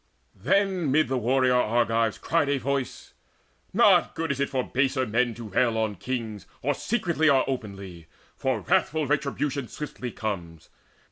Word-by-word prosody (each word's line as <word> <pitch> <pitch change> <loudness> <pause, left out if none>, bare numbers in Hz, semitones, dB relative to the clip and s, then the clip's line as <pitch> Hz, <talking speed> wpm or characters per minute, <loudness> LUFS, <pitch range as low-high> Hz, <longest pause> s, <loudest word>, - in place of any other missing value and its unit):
Then 185 - +1
mid 150 -2 +3
the 130 - 0
warrior 130 +2 +2
Argives 115 -2 +2
cried 165 -3 0
a 140 - +2
voice: 135 0 -3 0.6
"Not - - +4
good 165 -2 -1
it 140 - -3
is 140 - 0
for 130 -2 -1
baser 130 0 0
men 115 +1 0
to 115 -2 -8
rail 115 +3 +1
On 110 -1 0
kings, 110 0 -5 0.2
or 145 +3 +2
secretly 170 - 0
or 135 -2 +4
openly; 100 - -6 0.3
For - - -1
wrathful 155 -1 +1
retribution 140 -1 -1
swiftly 130 -4 -6
comes. 85 -8 -6
130 Hz, 150 wpm, -26 LUFS, 110-145 Hz, 0.6 s, Not